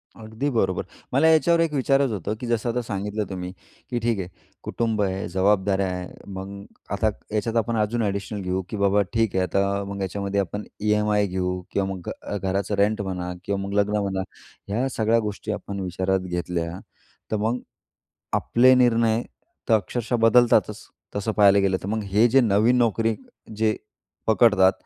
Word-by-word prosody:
अगदी 110 +5 -4
बरोबर. 110 -8 0 0.3
मला 140 +5 +4
याच्यावर 165 +1 +4
एक 165 -2 +1
विचारायचं 135 -2 +2
होतं, 100 +1 -3
की 125 - -5
जसं 120 0 0
आता 125 +1 0
सांगितलं 105 -1 -3
तुम्ही, 90 -1 -5 0.4
की 120 -2 -1
ठीक 115 -2 0
आहे 90 - -3 0.4
कुटुंब 115 -2 -1
आहे, 95 -1 -1
जबाबदारया 95 +1 +2
आहे, 90 -1 -4 0.2
मग 100 +1 -7 0.3
आता 100 +2 +1 0.3
याच्यात 110 +2 -1
आपण 115 +1 0
अजून 110 +2 0
एडिशनल 100 0 -3
घेऊ, 90 0 -1
की 110 - -4
बाबा 100 0 +3
ठीक 115 -3 +1
आहे, 95 - +2
आता 100 +1 0
मग 100 0 -5
याच्यामध्ये 100 +1 -2
आपण 100 +2 -2 0.2
ई-एम-आय 105 0 +2
घेऊ 90 0 -2
किंवा 100 -1 0
मग 90 -2 -7
अ, 105 - -4
घराचं 100 +1 -1
रेंट 105 +2 +2
म्हणा 90 -2 -4
किंवा 100 -1 -2
मग 100 0 -4
लग्न 105 +1 +1
म्हणा, 95 -1 -1 0.5
ह्या 115 +6 0
सगळ्या 110 +1 +3
गोष्टी 105 0 -4
आपण 100 -1 -5
विचारात 95 +1 0
घेतल्या 90 -1 -3 0.5
तर - - +1
मग 110 +4 0 0.8
आपले 130 +2 +5
निर्णय 115 -2 +3 0.5
तर 115 - +5
अक्षरशः 115 +3 -1
बदलतातच. 115 +1 +4 0.3
तसं 105 +2 -1
पाहायला 100 -1 +5
गेलं 95 -1 +2
तर, - - -5
मग 110 +1 -1
हे 105 +4 +3
जे 135 +3 +5
नवीन 110 +1 +3
नोकरी 115 -1 +2 0.4
जे 110 0 +1 0.5
पकडतात, 105 -4 +5
105 Hz, 170 wpm, -24 LUFS, 95-115 Hz, 0.8 s, आपले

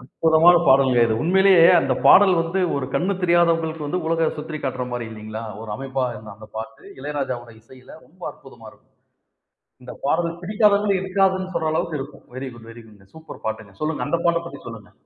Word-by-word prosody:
அற்புதமான 160 +6 +4
பாடல்ங்க. 130 -3 +4
இது 110 - 0
உண்மையிலேயே 185 -1 +5
அந்தப் 130 -4 -1
பாடல் 200 -1 +7
வந்து 165 +3 -1 0.2
ஒரு 130 -2 -3
கண்ணு 190 +3 0
தெரியாதவங்களுக்கு 165 -3 +1
வந்து 180 +5 -2
உலகை 165 0 +1
சுற்றி 155 0 -6
காட்டுற 130 -1 -3
மாரி 120 -1 -4
இல்லைங்களா? 110 +1 -8 0.2
ஒரு 110 -1 -8
அமைப்பா 135 -1 -3 0.3
அந்தப் 110 +1 -15
பாட்டு, 110 0 -8 0.2
இளையராஜாவோட 130 -4 -5
இசையில 130 +3 -17
ரொம்ப - - -24
அற்புதமா - - -16
இருக்கும். - - -26 0.9
இந்தப் 125 0 -11
பாடல் 170 +3 0
பிடிக்காதவங்க 205 +1 +2
இருக்காதுன்னு 190 0 0
சொல்ற 160 -2 0
அளவுக்கு 160 -1 -2
இருக்கும். 140 +2 -11
Very 130 +1 -5
good, 115 -1 -14
very 115 0 -13
good, 100 -3 -20
super 160 0 -12
பாட்டுங்க. 110 -2 -5
சொல்லுங்க, 155 0 -2
அந்தப் 170 0 -2
பாட்ட 170 0 +3
பத்தி 140 -5 -9
சொல்லுங்க. 115 -2 -11
150 Hz, 170 wpm, -22 LUFS, 125-170 Hz, 0.9 s, பாடல்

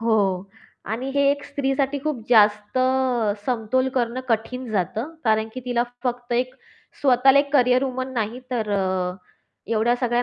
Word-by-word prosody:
हो. 200 -4 +1 0.4
आणि 245 +6 -3
हे 280 - +3
एक 285 0 -2
स्त्रीसाठी 275 0 -1
खूप 300 -6 -1
जास्त 210 0 +4 0.7
समतोल 255 +2 +1
करणं 245 0 0
कठीण 235 +3 -1
जातं. 220 - -2
कारण 220 0 +2
की 255 - -5
तिला 245 -1 +1 0.2
फक्त 245 -1 -2
एक 250 +1 0 0.5
स्वतःला 270 0 +5
एक 280 0 0
कॅरियर 255 -1 +4
वुमन 260 0 -3
नाही 230 +1 -2
तर 225 -4 -2
अ, 200 - +2 0.9
एवढ्या 230 +1 +2
सगळ्या 245 -1 +1
245 Hz, 145 wpm, -23 LUFS, 220-260 Hz, 0.9 s, स्वतःला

